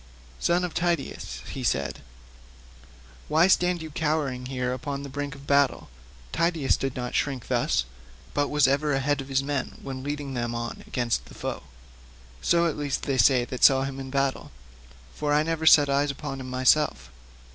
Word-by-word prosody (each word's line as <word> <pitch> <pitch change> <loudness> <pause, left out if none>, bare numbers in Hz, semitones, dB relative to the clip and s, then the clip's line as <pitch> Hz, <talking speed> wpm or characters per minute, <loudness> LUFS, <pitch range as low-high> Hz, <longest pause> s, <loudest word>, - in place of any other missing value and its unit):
"Son 175 +1 +2
of 180 - -3
Tydeus," 165 - -2
he - - -5
said, 70 +1 -1 1.3
"why 160 +3 +4
stand 180 -2 +2
you 160 - -8
cowering 145 -5 -1
here 125 -1 -2
upon 140 +2 -4
the 140 - -7
brink 145 0 -4
of 140 0 -13
battle? 140 0 +2 0.4
Tydeus 165 -5 +1
did 135 -1 -3
not 125 -1 -4
shrink 135 -4 -1
thus, - - +1 0.5
but 145 0 +1
was 145 -2 +3
ever 140 +2 +1
ahead 135 +1 +1
of 135 - -9
his 135 0 +1
men 140 -2 -3
when 135 -1 -5
leading 145 0 -4
them 120 -1 -2
on 115 0 -5
against 115 - -1
the - - -14
foe—so, 60 - -4
at 165 - -1
least, 145 -2 -2
say 140 - 0 0.3
they - - -3
that 125 0 -6
saw 135 -1 +7
him 135 0 -5
in 135 0 -6
battle, 135 0 -1 0.6
for 150 -1 -1
I 150 - +4
never 160 0 -1
set 145 -2 +8
eyes 140 +1 +1
upon 135 0 -5
him 130 -1 -7
myself. 130 - +2
135 Hz, 175 wpm, -26 LUFS, 125-150 Hz, 1.3 s, set